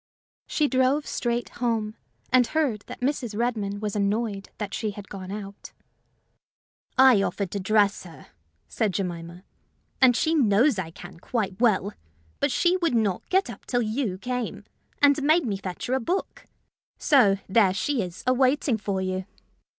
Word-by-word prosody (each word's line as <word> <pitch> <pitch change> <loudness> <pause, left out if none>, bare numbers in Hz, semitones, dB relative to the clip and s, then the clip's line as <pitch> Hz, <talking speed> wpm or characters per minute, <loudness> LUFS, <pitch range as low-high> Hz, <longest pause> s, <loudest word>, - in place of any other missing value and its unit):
She 300 - +1
drove 265 +2 +2
straight 240 0 -2
home, 220 -3 0 0.4
and 250 -2 +5
heard 285 -10 0
that - - -9
Mrs. 250 -5 -1
Redmain 210 -4 -1
was 210 -1 -3
annoyed 205 0 -1
that 205 -2 -5
she 220 - -2
had 205 -1 -9
gone 185 -2 -8
out. 200 -1 -8 1.2
"I 260 -6 +7
offered 200 -1 -2
to 200 - -3
dress 205 +1 +2
her," 165 -6 -13 0.4
said 210 -5 -1
Jemima; 175 -2 -4 0.6
"and 255 -2 +6
she 315 +6 +1
knows 240 -3 +3
I 170 -3 -4
can 165 0 -12
quite 205 0 -3
well; 210 -3 +2 0.5
but 285 - +1
she 350 +8 +2
would 335 -8 0
not 210 -5 0
get 380 -3 +2
up 235 -4 -10
till 245 -1 +1
you 215 -3 -2
came, 250 +3 -4 0.4
and 285 0 +5
made 310 +2 +3
me 205 -4 -1
fetch 185 -2 -6
her 250 - -2
a 265 - +2
book. 355 +11 -3 0.5
So 215 -10 +4
there 195 -1 +4
she 260 +6 -1
is, 180 -2 -6
a 255 - +3
waiting 260 -2 +2
for 200 -2 -2
you!" 185 0 -3
220 Hz, 165 wpm, -25 LUFS, 200-255 Hz, 1.2 s, I